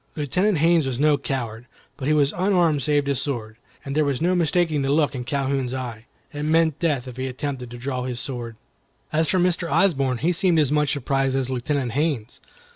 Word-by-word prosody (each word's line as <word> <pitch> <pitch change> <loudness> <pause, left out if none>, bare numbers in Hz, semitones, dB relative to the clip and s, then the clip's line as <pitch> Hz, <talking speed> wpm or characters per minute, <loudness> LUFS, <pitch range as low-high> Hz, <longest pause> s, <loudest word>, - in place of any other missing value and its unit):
Lieutenant 180 +7 +1
Haines 165 -1 +3
was 130 -2 -3
no 150 0 +4
coward, 120 -4 -4 0.3
but 135 -2 -5
he 155 - +3
was 145 0 +2
unarmed 175 -5 +2
save 145 +1 +1
his 140 -2 0
sword, 115 -6 -4 0.3
and 140 - -4
there 155 - +3
was 140 -3 0
no 175 +3 +2
mistaking 165 -3 +1
the 135 - -1
look 145 +1 +2
in 125 -2 -4
Calhoun's 135 -1 -1
eye. 120 -3 -6 0.3
It 145 - -5
meant 160 0 +2
death 145 -7 0
if 125 -1 -9
he 130 0 -2
attempted 130 -1 -4
to 120 - -8
draw 130 +1 -3
his 125 -2 -4
sword. 120 -4 -5 0.6
As 160 0 +2
for 185 - +2
Mr. 175 -1 +1
Osborne, 135 -10 +2
he 160 +9 +1
seemed 180 -1 +2
as 145 -3 +3
much 150 -1 +2
surprised 135 -1 0
as 130 -1 -2
Lieutenant 130 0 -1
Haines. 140 -5 -2
140 Hz, 205 wpm, -23 LUFS, 130-155 Hz, 0.6 s, no